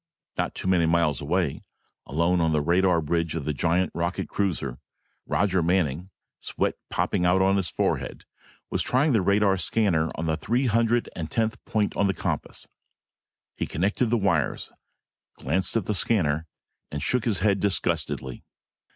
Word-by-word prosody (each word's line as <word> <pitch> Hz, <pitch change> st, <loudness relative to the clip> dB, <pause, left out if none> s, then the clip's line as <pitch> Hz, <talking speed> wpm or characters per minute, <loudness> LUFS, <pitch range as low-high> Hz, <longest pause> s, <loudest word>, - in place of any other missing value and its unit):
Not -, -, -2 dB
too -, -, -4 dB
many 90 Hz, -3 st, +3 dB
miles 80 Hz, -5 st, +2 dB
away, 80 Hz, 0 st, -1 dB, 0.5 s
alone 85 Hz, +4 st, +1 dB
on 80 Hz, -1 st, +2 dB
the 75 Hz, -, +2 dB
radar 85 Hz, +2 st, +3 dB
bridge 85 Hz, +1 st, -1 dB
of 80 Hz, -4 st, -3 dB
the 75 Hz, -, -1 dB
giant 85 Hz, +5 st, +1 dB
rocket 85 Hz, +2 st, -2 dB
cruiser, 80 Hz, -10 st, -2 dB, 0.5 s
Roger 95 Hz, -3 st, +1 dB
Manning, 85 Hz, -1 st, 0 dB, 0.3 s
sweat -, -, -1 dB, 0.2 s
popping -, -, 0 dB
out 90 Hz, +1 st, +4 dB
on 95 Hz, +1 st, +3 dB
his 95 Hz, -3 st, 0 dB
forehead, -, -, -2 dB, 0.5 s
was -, -, 0 dB
trying 135 Hz, +3 st, +2 dB
the 110 Hz, -, +3 dB
radar 100 Hz, +1 st, +3 dB
scanner 85 Hz, -3 st, +1 dB
on 80 Hz, -, -3 dB
the 80 Hz, -1 st, +1 dB
three 120 Hz, -, 0 dB
hundred 115 Hz, 0 st, +2 dB
and 80 Hz, -2 st, -4 dB
tenth 110 Hz, +4 st, -1 dB
point 105 Hz, -2 st, 0 dB
on 100 Hz, -, +2 dB
the 95 Hz, -, 0 dB
compass. -, -, -4 dB, 0.9 s
He -, -, -3 dB
connected 100 Hz, +8 st, 0 dB
the 120 Hz, +2 st, +2 dB
wires, 90 Hz, -, 0 dB, 0.7 s
glanced 95 Hz, -, 0 dB
at 105 Hz, -, -2 dB
the 105 Hz, -, -1 dB
scanner, 80 Hz, -7 st, +2 dB, 0.4 s
and 75 Hz, -2 st, -4 dB
shook 125 Hz, -3 st, 0 dB
his 110 Hz, -6 st, 0 dB
head 100 Hz, -2 st, +2 dB
disgustedly. 85 Hz, -9 st, -1 dB
90 Hz, 160 wpm, -25 LUFS, 80-100 Hz, 0.9 s, out